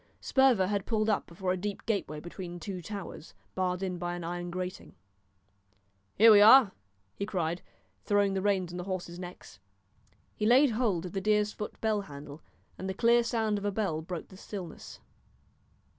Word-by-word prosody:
Sperver 265 Hz, -8 st, +3 dB
had 200 Hz, 0 st, -2 dB
pulled 220 Hz, -1 st, +1 dB
up 210 Hz, -, -1 dB
before 180 Hz, +2 st, -3 dB
a 185 Hz, -, 0 dB
deep 205 Hz, +2 st, -5 dB
gateway 195 Hz, -9 st, -2 dB
between 175 Hz, +1 st, -8 dB
two 185 Hz, -1 st, -6 dB
towers, 200 Hz, -3 st, -8 dB, 0.2 s
barred 185 Hz, 0 st, -1 dB
in 180 Hz, -2 st, -3 dB
by 175 Hz, 0 st, -3 dB
an 175 Hz, -, -6 dB
iron 175 Hz, +1 st, -4 dB
grating. 185 Hz, +1 st, -6 dB, 1.2 s
"Here 225 Hz, +2 st, +8 dB
we 205 Hz, -1 st, +8 dB
are," 220 Hz, 0 st, +8 dB, 0.4 s
he 200 Hz, -, -4 dB
cried, 175 Hz, -3 st, -2 dB, 0.4 s
throwing 205 Hz, -1 st, +2 dB
the 190 Hz, -, -1 dB
reins 190 Hz, -3 st, 0 dB
on -, -, -5 dB
the 180 Hz, -, -5 dB
horses' 180 Hz, -2 st, -5 dB
necks. 180 Hz, -, -10 dB, 0.8 s
He 210 Hz, -, 0 dB
laid 260 Hz, +3 st, +6 dB
hold 215 Hz, -7 st, 0 dB
of 180 Hz, -, -6 dB
the 195 Hz, -, -3 dB
deer's 210 Hz, +1 st, +2 dB
foot 210 Hz, -, -7 dB
bell 215 Hz, -2 st, +1 dB
handle, 145 Hz, -3 st, -10 dB, 0.4 s
and 190 Hz, +2 st, -4 dB
the 190 Hz, -, -3 dB
clear 235 Hz, +3 st, +4 dB
sound 220 Hz, -3 st, 0 dB
of -, -, -9 dB
a 205 Hz, -, +1 dB
bell 195 Hz, -7 st, -1 dB
broke 170 Hz, 0 st, -6 dB
the 185 Hz, -, -13 dB
stillness. 185 Hz, -5 st, -8 dB
190 Hz, 180 wpm, -30 LUFS, 175-210 Hz, 1.2 s, Here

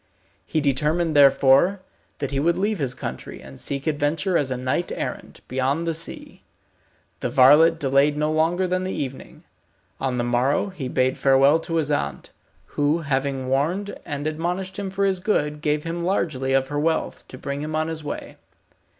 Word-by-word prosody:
He 155 Hz, -, 0 dB
determined 150 Hz, +4 st, +1 dB
therefore 140 Hz, +6 st, +5 dB, 0.4 s
that 140 Hz, -2 st, -4 dB
he 135 Hz, -, 0 dB
would 170 Hz, +4 st, +2 dB
leave 205 Hz, +2 st, 0 dB
his 130 Hz, -3 st, -1 dB
country, 65 Hz, -, -6 dB
and 65 Hz, 0 st, -12 dB
seek 140 Hz, -1 st, -4 dB
adventure 155 Hz, +3 st, 0 dB
as 145 Hz, -5 st, +2 dB
a 130 Hz, -, -2 dB
knight 130 Hz, +7 st, -1 dB
errant, -, -, -5 dB
beyond 135 Hz, +5 st, 0 dB
the 165 Hz, -, 0 dB
sea. 165 Hz, +1 st, -6 dB, 0.8 s
The -, -, -2 dB
varlet 150 Hz, +6 st, +6 dB
delayed 140 Hz, +1 st, +2 dB
no 150 Hz, +1 st, +1 dB
longer 165 Hz, +4 st, +1 dB
than 185 Hz, 0 st, -1 dB
the 185 Hz, -, -3 dB
evening. 135 Hz, -1 st, -6 dB, 0.6 s
On 130 Hz, -2 st, -1 dB
the 120 Hz, -, 0 dB
morrow 125 Hz, +9 st, +1 dB
he 165 Hz, -9 st, -6 dB
bade 130 Hz, +1 st, 0 dB
farewell 135 Hz, +3 st, +5 dB
to 165 Hz, 0 st, -4 dB
his 155 Hz, -2 st, 0 dB
aunt, 70 Hz, -, -2 dB, 0.3 s
who 150 Hz, +3 st, 0 dB
having 135 Hz, -2 st, -1 dB
warned 165 Hz, +10 st, 0 dB
and 145 Hz, -1 st, -5 dB
admonished 180 Hz, +5 st, -3 dB
him 200 Hz, -1 st, -3 dB
for 195 Hz, +1 st, 0 dB
his 190 Hz, -2 st, +1 dB
good, 150 Hz, -6 st, 0 dB
gave 150 Hz, 0 st, 0 dB
him 170 Hz, +1 st, -4 dB
largely 150 Hz, -8 st, 0 dB
of 135 Hz, 0 st, +2 dB
her 145 Hz, 0 st, -2 dB
wealth, 160 Hz, +2 st, -1 dB
to -, -, -10 dB
bring 140 Hz, 0 st, -4 dB
him 155 Hz, +1 st, -4 dB
on 155 Hz, 0 st, 0 dB
his 160 Hz, -1 st, -5 dB
way. 145 Hz, -, -6 dB
150 Hz, 180 wpm, -23 LUFS, 135-165 Hz, 0.8 s, varlet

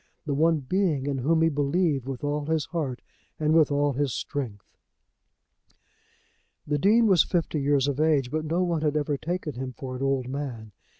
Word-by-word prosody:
The 145 Hz, -, -1 dB
one 160 Hz, +2 st, +2 dB
being 155 Hz, -2 st, 0 dB
in 140 Hz, -2 st, -1 dB
whom 160 Hz, +5 st, +2 dB
he 165 Hz, -, +4 dB
believed 145 Hz, -1 st, 0 dB
with 135 Hz, -1 st, -5 dB
all 145 Hz, 0 st, -2 dB
his 160 Hz, -3 st, 0 dB
heart 145 Hz, -8 st, -4 dB, 0.4 s
and 155 Hz, 0 st, +2 dB
with 160 Hz, -2 st, +4 dB
all 145 Hz, 0 st, +1 dB
his 140 Hz, 0 st, 0 dB
strength! 120 Hz, -9 st, -5 dB, 1.9 s
The 145 Hz, 0 st, -1 dB
Dean 220 Hz, +7 st, +4 dB
was 190 Hz, -7 st, +5 dB
fifty 165 Hz, -4 st, -1 dB
years 140 Hz, -1 st, +2 dB
of 140 Hz, 0 st, -2 dB
age, 150 Hz, -5 st, +2 dB
but 155 Hz, +1 st, -1 dB
no 170 Hz, +4 st, 0 dB
one 170 Hz, -3 st, 0 dB
had 150 Hz, -1 st, +1 dB
ever 145 Hz, -1 st, 0 dB
taken 165 Hz, +1 st, -4 dB
him 130 Hz, +1 st, -5 dB
for 130 Hz, -1 st, -6 dB
an 125 Hz, -, -6 dB
old 135 Hz, -2 st, 0 dB
man. 130 Hz, -6 st, -5 dB
145 Hz, 185 wpm, -26 LUFS, 135-160 Hz, 1.9 s, was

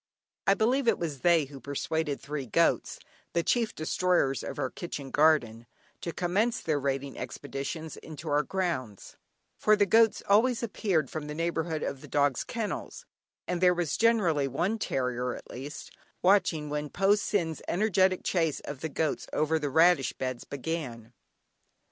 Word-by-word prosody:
I 195 Hz, -, +6 dB
believe 240 Hz, +5 st, +1 dB
it 225 Hz, -, +4 dB
was 155 Hz, -5 st, -4 dB
they 170 Hz, 0 st, +4 dB
who 135 Hz, 0 st, -11 dB
persuaded 145 Hz, +2 st, -2 dB
three 140 Hz, -2 st, -5 dB
goats -, -, +2 dB, 0.4 s
(the 170 Hz, -, +1 dB
chief 235 Hz, +2 st, +1 dB
destroyers 155 Hz, -3 st, +1 dB
of -, -, -6 dB
our -, -, -2 dB
kitchen 145 Hz, -6 st, -6 dB
garden) 120 Hz, -7 st, +3 dB, 0.3 s
to 170 Hz, -, -3 dB
commence 200 Hz, +8 st, 0 dB
their 155 Hz, -3 st, 0 dB
raiding 135 Hz, 0 st, -2 dB
expeditions 140 Hz, +5 st, -5 dB
into 160 Hz, 0 st, -9 dB
our 145 Hz, 0 st, +3 dB
grounds, 150 Hz, -, -3 dB, 0.4 s
for 215 Hz, -, +5 dB
the 205 Hz, -1 st, +3 dB
goats 225 Hz, +2 st, +4 dB
always 230 Hz, +4 st, +3 dB
appeared 190 Hz, -, 0 dB
from 155 Hz, -2 st, -5 dB
the 150 Hz, -, -5 dB
neighbourhood 165 Hz, -1 st, -1 dB
of 135 Hz, -, -4 dB
the -, -, -11 dB
dog's 145 Hz, -3 st, +1 dB
kennels, 230 Hz, -, -5 dB, 0.4 s
and 180 Hz, -1 st, -2 dB
there 180 Hz, -1 st, +5 dB
was 170 Hz, -4 st, -1 dB
generally 185 Hz, -12 st, +3 dB
one 180 Hz, -, -1 dB
terrier, 125 Hz, -, -1 dB
at -, -, -11 dB
least, 140 Hz, +4 st, -8 dB, 0.3 s
watching 180 Hz, -5 st, +3 dB
when 150 Hz, 0 st, -2 dB
Po 195 Hz, +6 st, +3 dB
Sin's 185 Hz, -6 st, -1 dB
energetic 190 Hz, -2 st, +2 dB
chase 165 Hz, -5 st, 0 dB
of 145 Hz, -2 st, -7 dB
the 160 Hz, -, -3 dB
goats 155 Hz, +1 st, -1 dB
over 155 Hz, +1 st, +1 dB
the 145 Hz, -2 st, -2 dB
radish 160 Hz, -3 st, +4 dB
beds 130 Hz, -2 st, -4 dB
began. 130 Hz, -6 st, -5 dB
160 Hz, 160 wpm, -29 LUFS, 140-185 Hz, 0.4 s, I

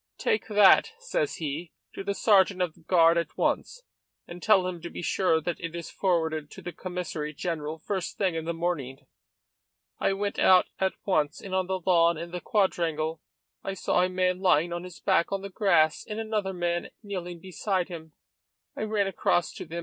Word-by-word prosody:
'Take 450 Hz, -2 st, 0 dB
that,' 210 Hz, -, +6 dB
says 485 Hz, -1 st, -2 dB
he, 155 Hz, +2 st, -4 dB, 0.2 s
'to -, -, -6 dB
the 200 Hz, 0 st, -2 dB
sergeant 195 Hz, -3 st, +4 dB
of 180 Hz, -3 st, 0 dB
the -, -, -23 dB
guard 165 Hz, 0 st, +4 dB
at 170 Hz, -, -5 dB
once, -, -, -1 dB, 0.4 s
and 175 Hz, +1 st, -9 dB
tell 190 Hz, -2 st, +4 dB
him 180 Hz, -2 st, -4 dB
to 170 Hz, -, -6 dB
be -, -, -7 dB
sure 170 Hz, -2 st, +2 dB
that 170 Hz, +2 st, -3 dB
it 165 Hz, 0 st, -5 dB
is 170 Hz, -1 st, -6 dB
forwarded 160 Hz, -5 st, 0 dB
to -, -, -11 dB
the 175 Hz, -, -5 dB
Commissary 170 Hz, -4 st, -5 dB
General 160 Hz, -2 st, -3 dB
first 190 Hz, +1 st, -4 dB
thing 190 Hz, -4 st, +1 dB
in 160 Hz, -1 st, -3 dB
the 170 Hz, -, -1 dB
morning.' 150 Hz, -6 st, -3 dB, 0.9 s
I -, -, +2 dB
went 200 Hz, +1 st, -2 dB
out 185 Hz, -1 st, +6 dB
at 190 Hz, 0 st, +1 dB
once, 155 Hz, -6 st, +1 dB
and 195 Hz, -, -8 dB
on 185 Hz, -1 st, +1 dB
the 190 Hz, 0 st, -2 dB
lawn 170 Hz, -2 st, +4 dB
in 170 Hz, +2 st, -6 dB
the 180 Hz, 0 st, -5 dB
quadrangle 165 Hz, -6 st, 0 dB, 0.4 s
I 195 Hz, -, -3 dB
saw 180 Hz, -, +1 dB
a 180 Hz, -, +2 dB
man 185 Hz, 0 st, 0 dB
lying 175 Hz, -3 st, +3 dB
on 175 Hz, +1 st, -4 dB
his 180 Hz, -1 st, -11 dB
back 170 Hz, -, +2 dB
on 195 Hz, 0 st, -2 dB
the 200 Hz, -, -6 dB
grass 160 Hz, -6 st, +3 dB
and 210 Hz, +1 st, -4 dB
another 215 Hz, -3 st, -1 dB
man 175 Hz, -1 st, -2 dB
kneeling 180 Hz, -4 st, -5 dB
beside 185 Hz, +1 st, -2 dB
him. 160 Hz, -3 st, -9 dB, 0.6 s
I -, -, -5 dB
ran 210 Hz, -2 st, +1 dB
across 175 Hz, -2 st, 0 dB
to -, -, -7 dB
them. 170 Hz, +1 st, -5 dB
180 Hz, 195 wpm, -27 LUFS, 165-195 Hz, 0.9 s, that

